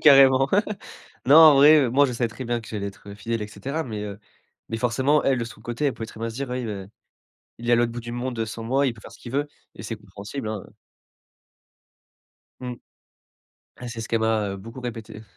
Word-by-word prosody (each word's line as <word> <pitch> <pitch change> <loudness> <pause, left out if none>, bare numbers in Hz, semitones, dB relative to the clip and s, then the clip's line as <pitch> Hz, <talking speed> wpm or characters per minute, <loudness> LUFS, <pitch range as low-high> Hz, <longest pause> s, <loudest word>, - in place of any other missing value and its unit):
carrément! 135 -2 +7 0.8
Non 140 - +8
en 160 -2 +10
vrai, 150 +3 +8
heu, 120 - -2
moi 140 +3 +5
je 125 - -3
savais 120 0 0
très 125 +3 -8
bien 120 0 -1
que 110 - -13
j'allais 105 -2 -3
être 100 0 -9
fidèle 115 +1 -3
et - - -4
cetera, 140 +8 -4
mais, 110 -7 -5
heu, 100 -1 -6 0.5
mais 115 - -2
forcément 130 +6 +2
elle, 135 -2 +3
de 115 - -1
son 110 -1 -11
côté, 120 +5 -2
elle 135 - 0
pouvait 110 - -6
très 110 - -12
bien 115 0 -2
se - - -10
dire: 135 0 -4
«Oui, 125 0 -2
beh, 100 -4 -5 0.7
il 120 - -6
est - - +5
à - - +7
l'autre 120 -1 +2
bout 120 - -5
du 120 0 -7
monde, 120 -1 -3
heu, 110 - 0
sans 115 +1 -6
moi, 135 +4 +2
il 125 - +1
peut 110 - -15
faire - - -12
ce - - -15
qu'il 120 - -9
veut» 145 +2 0 0.3
et - - -9
c'est 115 - -4
compréhensible, 105 +4 -7
hein, 110 -3 -4
heu - - -21 1.9
Mmh. 125 -1 -4 1.1
Ouais 125 - -6
c'est 115 -1 -6
ce 115 - -6
qu'elle 115 -1 +1
m'a, 110 -2 +1
heu, 100 - -4
beaucoup 115 +6 -9
répété. 110 -3 -7
120 Hz, 240 wpm, -24 LUFS, 110-130 Hz, 1.9 s, en